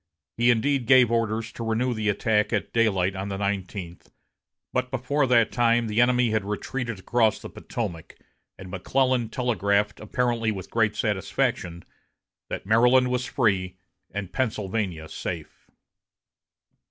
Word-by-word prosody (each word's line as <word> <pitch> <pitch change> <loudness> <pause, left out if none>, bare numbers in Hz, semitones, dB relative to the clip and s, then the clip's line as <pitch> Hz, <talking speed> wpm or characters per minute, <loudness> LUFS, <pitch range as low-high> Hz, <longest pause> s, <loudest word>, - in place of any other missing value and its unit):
He 120 +1 +3
indeed 125 +1 +2
gave 130 -3 +6
orders 115 0 0
to 115 - -7
renew 115 +3 0
the 110 -2 -1
attack 105 0 +1
at 105 -3 -2
daylight 95 -5 +2
on 95 +1 -4
the 100 - -3
nineteenth, 95 -3 -4 0.6
but 125 0 0
before 135 +2 0
that 120 -3 +4
time 120 -1 +2
the 110 +1 +1
enemy 125 -1 +3
had 110 -2 0
retreated 115 +3 -4
across 110 +3 +1
the - - -10
Potomac, 90 -9 -6 0.4
and 95 -1 -10
McClellan 125 +5 +1
telegraphed, 105 -4 0
apparently 115 0 0
with 95 -3 -7
great 110 -2 +1
satisfaction, 90 -4 -1 0.7
that - - -5
Maryland 125 +4 +4
was 125 0 -1
free 95 -7 0 0.3
and 100 -1 -6
Pennsylvania 105 -8 -2
safe. - - -7
110 Hz, 135 wpm, -25 LUFS, 100-120 Hz, 0.7 s, gave